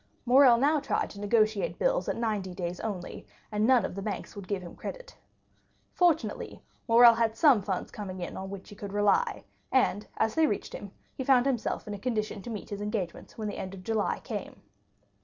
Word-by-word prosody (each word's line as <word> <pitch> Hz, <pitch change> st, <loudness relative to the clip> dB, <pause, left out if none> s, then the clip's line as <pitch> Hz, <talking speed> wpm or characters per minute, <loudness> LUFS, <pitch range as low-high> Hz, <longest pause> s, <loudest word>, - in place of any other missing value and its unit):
Morrel 255 Hz, -1 st, +7 dB
now 295 Hz, +5 st, +3 dB
tried 285 Hz, -, -1 dB
to 200 Hz, -, -10 dB
negotiate 215 Hz, 0 st, +1 dB
bills -, -, +1 dB
at -, -, -1 dB
ninety 210 Hz, -6 st, -2 dB
days 175 Hz, -1 st, -4 dB
only, 190 Hz, -, -5 dB, 0.2 s
and 210 Hz, +1 st, +1 dB
none 250 Hz, -6 st, +5 dB
of -, -, -5 dB
the 195 Hz, -, -5 dB
banks 200 Hz, +1 st, -5 dB
would 200 Hz, -2 st, -8 dB
give 195 Hz, -2 st, -2 dB
him 175 Hz, -, -10 dB
credit. -, -, -8 dB, 0.8 s
Fortunately, 340 Hz, -3 st, +1 dB, 0.3 s
Morrel 235 Hz, 0 st, +8 dB
had 225 Hz, -1 st, 0 dB
some 270 Hz, -6 st, +5 dB
funds 190 Hz, -2 st, -3 dB
coming 190 Hz, -3 st, -6 dB
in 175 Hz, -, -5 dB
on 190 Hz, 0 st, -6 dB
which 195 Hz, -1 st, -8 dB
he 205 Hz, -, -11 dB
could 200 Hz, -1 st, -7 dB
rely; 210 Hz, -, +2 dB, 0.3 s
and, 215 Hz, -6 st, +2 dB
as 220 Hz, 0 st, +1 dB
they 320 Hz, -1 st, +3 dB
reached 205 Hz, -, -3 dB
him, 200 Hz, -, -7 dB, 0.2 s
he 265 Hz, -, -4 dB
found 255 Hz, -1 st, +4 dB
himself 245 Hz, -7 st, -1 dB
in 210 Hz, -, -4 dB
a 205 Hz, -, -6 dB
condition 215 Hz, -3 st, -2 dB
to 240 Hz, -, -8 dB
meet 215 Hz, -3 st, -6 dB
his 205 Hz, 0 st, -4 dB
engagements 205 Hz, -5 st, -4 dB
when 215 Hz, -2 st, -3 dB
the 205 Hz, -, -5 dB
end 190 Hz, +1 st, -5 dB
of 185 Hz, -, -11 dB
July 220 Hz, +1 st, 0 dB
came. 210 Hz, -4 st, -7 dB
215 Hz, 205 wpm, -29 LUFS, 200-245 Hz, 0.8 s, Morrel